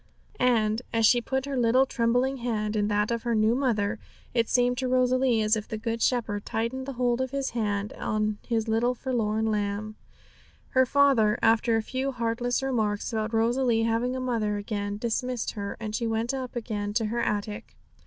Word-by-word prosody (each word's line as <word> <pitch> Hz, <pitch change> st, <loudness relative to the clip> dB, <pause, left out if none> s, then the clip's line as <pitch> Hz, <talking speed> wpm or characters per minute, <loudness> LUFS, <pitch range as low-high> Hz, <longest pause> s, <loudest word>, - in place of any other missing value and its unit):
And, 225 Hz, -3 st, +2 dB
as 225 Hz, -1 st, +3 dB
she 240 Hz, +2 st, +5 dB
put 265 Hz, +2 st, -2 dB
her 280 Hz, -1 st, -3 dB
little 250 Hz, +2 st, +4 dB
trembling 250 Hz, +2 st, +1 dB
hand 220 Hz, -3 st, -2 dB
in 205 Hz, -1 st, +1 dB
that 210 Hz, +1 st, +1 dB
of 235 Hz, -1 st, -1 dB
her 235 Hz, 0 st, 0 dB
new 215 Hz, +1 st, +3 dB
mother, 230 Hz, -5 st, 0 dB, 0.3 s
it 230 Hz, -2 st, +1 dB
seemed 245 Hz, 0 st, +2 dB
to 260 Hz, -, -1 dB
Rosalie 255 Hz, -2 st, +2 dB
as 215 Hz, +1 st, +3 dB
if 215 Hz, -1 st, -4 dB
the 220 Hz, -, -4 dB
Good 230 Hz, +1 st, -3 dB
Shepherd 220 Hz, -5 st, 0 dB
tightened 255 Hz, +4 st, -3 dB
the 275 Hz, -, -4 dB
hold 245 Hz, 0 st, 0 dB
of 260 Hz, -, -1 dB
His 275 Hz, 0 st, -2 dB
hand 210 Hz, -3 st, -2 dB
on 215 Hz, -1 st, -1 dB
His 230 Hz, -2 st, 0 dB
little 235 Hz, +3 st, +1 dB
forlorn 220 Hz, -4 st, -1 dB
lamb. 210 Hz, +1 st, -2 dB, 0.7 s
Her 260 Hz, 0 st, +3 dB
father, 260 Hz, -7 st, +4 dB
after 225 Hz, +1 st, +4 dB
a 225 Hz, -, +1 dB
few 265 Hz, +3 st, -2 dB
heartless 240 Hz, +1 st, -1 dB
remarks 220 Hz, -6 st, -1 dB
about 220 Hz, 0 st, -1 dB
Rosalie 230 Hz, 0 st, +2 dB
having 230 Hz, +3 st, 0 dB
a -, -, -2 dB
mother 225 Hz, -5 st, -1 dB
again, 205 Hz, 0 st, -3 dB
dismissed 240 Hz, +2 st, -2 dB
her, 200 Hz, -1 st, -5 dB
and 215 Hz, -2 st, -5 dB
she 235 Hz, -, -1 dB
went 225 Hz, +3 st, -1 dB
up 260 Hz, -2 st, -5 dB
again 210 Hz, -3 st, -3 dB
to 225 Hz, -1 st, +2 dB
her 235 Hz, +2 st, -1 dB
attic. 210 Hz, +1 st, -3 dB
230 Hz, 190 wpm, -27 LUFS, 215-250 Hz, 0.7 s, she